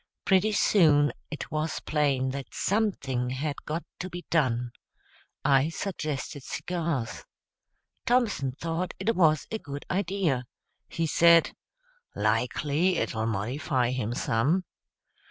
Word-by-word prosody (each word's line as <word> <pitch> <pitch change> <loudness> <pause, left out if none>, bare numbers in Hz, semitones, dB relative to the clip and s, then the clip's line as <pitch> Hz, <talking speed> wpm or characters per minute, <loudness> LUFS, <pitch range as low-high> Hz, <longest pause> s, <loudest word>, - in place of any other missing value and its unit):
Pretty 195 +2 +4
soon 150 -9 +4 0.2
it 150 - -6
was 155 0 -1
plain 140 -4 +1
that 135 0 -6
something 140 - 0
had 140 +3 -2
got 160 +3 -3 0.2
to 185 - -4
be 175 0 -8
done. 125 -7 +1 0.7
I 135 +2 +4
suggested 155 -6 -4
cigars. 165 -5 -3 0.8
Thompson 225 - +2
thought 165 +5 -3
it 215 +4 0
was 155 -4 +4
a 220 - -2
good 140 -4 -7
idea. 180 -9 0 0.4
He 165 - -1
said, 170 +1 +5 0.6
"Likely 140 - +1
it'll 110 -1 -1
modify 125 +4 0
him 120 -2 -2
some." 140 +14 +1
150 Hz, 115 wpm, -28 LUFS, 130-175 Hz, 0.8 s, said